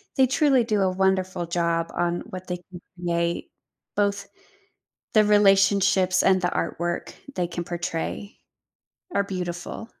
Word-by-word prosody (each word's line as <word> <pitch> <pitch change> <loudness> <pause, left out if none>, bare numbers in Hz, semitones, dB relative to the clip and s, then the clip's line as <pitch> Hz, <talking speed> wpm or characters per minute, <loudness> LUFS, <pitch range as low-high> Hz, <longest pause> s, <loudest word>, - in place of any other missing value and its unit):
they 265 - +5
truly 265 -1 +3
do 215 -3 0
a 190 - +2
wonderful 185 -1 0
job 170 -1 0
on 175 0 0
what 185 -2 -8
they 180 - -2
can 175 0 -13 0.2
create, 170 -1 -1 0.4
both, 200 -1 0 0.9
the 215 - +6
relationships 195 -2 +4
and 190 -1 +4
the 175 - +2
artwork 170 +1 -2 0.2
they 180 - 0
can 175 0 -4
portray, 175 +3 -4 0.8
are 200 - +2
beautiful. 180 +1 -5
185 Hz, 130 wpm, -25 LUFS, 175-200 Hz, 0.9 s, the